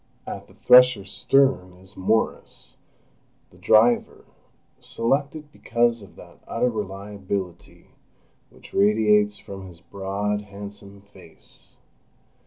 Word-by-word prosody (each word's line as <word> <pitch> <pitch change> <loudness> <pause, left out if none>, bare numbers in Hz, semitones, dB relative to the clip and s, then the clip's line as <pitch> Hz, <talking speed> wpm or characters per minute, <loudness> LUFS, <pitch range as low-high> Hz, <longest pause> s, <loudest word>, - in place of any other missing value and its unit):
At - - -8
the - - -20
thresher's 125 -6 +5
stern 130 -9 +2
is 95 +3 -16
Morris, 110 +4 -2 0.7
the - - -20
driver, 115 +2 +2 0.5
selected 140 +5 -2
because 120 -2 0
of 100 - -15
that - - -15
utter 125 - 0
reliability 100 -3 -6 0.6
which - - -18
radiates 105 0 +3
from 95 -1 -10
his 85 -2 -14
broad, 100 +2 -3
handsome 100 0 -11
face. 95 -4 -15
105 Hz, 100 wpm, -23 LUFS, 95-115 Hz, 0.7 s, thresher's